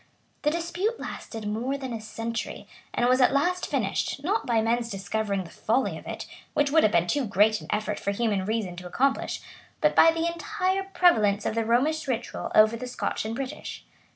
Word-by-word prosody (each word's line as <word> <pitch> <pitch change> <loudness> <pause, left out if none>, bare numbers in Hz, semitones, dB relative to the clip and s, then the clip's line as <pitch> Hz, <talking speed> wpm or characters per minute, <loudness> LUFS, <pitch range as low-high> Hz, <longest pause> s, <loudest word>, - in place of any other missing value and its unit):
[*] - - -40
The 300 - +2
dispute 345 +8 -2
lasted 225 -2 -6
more 240 +6 -1
than 265 -3 -5
a 225 - -4
century; 225 +1 -5 0.2
and 240 - +1
was 255 +1 +4
at 250 - +6
last 355 +6 +1
finished, 280 - -1
not 400 +3 0
by 235 -2 +3
men's 230 +1 +1
discovering 200 0 -2
the 170 - -12
folly 250 +5 0
of - - -10
it, - - -5 0.3
which 285 -1 +2
would 320 +1 +6
have 215 - +4
been 170 -2 +3
too 285 +10 0
great 210 +2 +3
an - - -11
effort 210 0 -1
for - - -2
human 205 -2 0
reason 210 -4 -2
to 180 0 -7
accomplish, 270 +9 0 0.4
but - - +3
by 330 - +8
the 330 0 -1
entire 375 +3 -1
prevalence 215 - +4
of - - 0
the 225 0 0
Romish 285 +7 +1
ritual 245 -3 -3
over 215 +1 +6
the 250 +2 -6
Scotch 245 - -3
and 220 +1 -3
British. 265 0 -6
235 Hz, 205 wpm, -27 LUFS, 215-295 Hz, 0.4 s, by